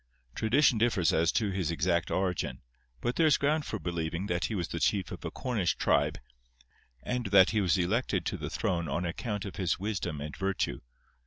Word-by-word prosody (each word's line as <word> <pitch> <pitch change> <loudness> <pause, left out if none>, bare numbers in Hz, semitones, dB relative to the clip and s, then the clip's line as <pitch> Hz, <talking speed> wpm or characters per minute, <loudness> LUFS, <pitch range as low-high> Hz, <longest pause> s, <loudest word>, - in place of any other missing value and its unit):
Tradition 120 +1 +3
differs 100 -8 +2
as 80 +1 +3
to 105 -3 +1
his 95 -4 -1
exact 85 +1 0
origin, 95 -2 -1 0.4
but 120 - -1
there 165 - +5
is 150 - +5
ground 150 +1 +1
for 110 - -3
believing 85 -1 -3
that 85 -3 -1
he 110 - -2
was 85 -3 -2
the 85 - -3
chief 95 -1 +1
of - - -7
a - - -3
Cornish 115 -9 -1
tribe, - - +2 0.9
and 125 -3 -2
that 95 -1 +6
he 110 -1 +2
was 90 -4 +2
elected 95 0 0
to - - -1
the - - -5
throne 85 -3 -1
on 85 +6 -1
account 105 +4 -3
of 100 - -7
his 90 -3 0
wisdom 95 -6 -3
and 75 0 -6
virtue. 95 -10 -1
95 Hz, 195 wpm, -30 LUFS, 85-110 Hz, 0.9 s, that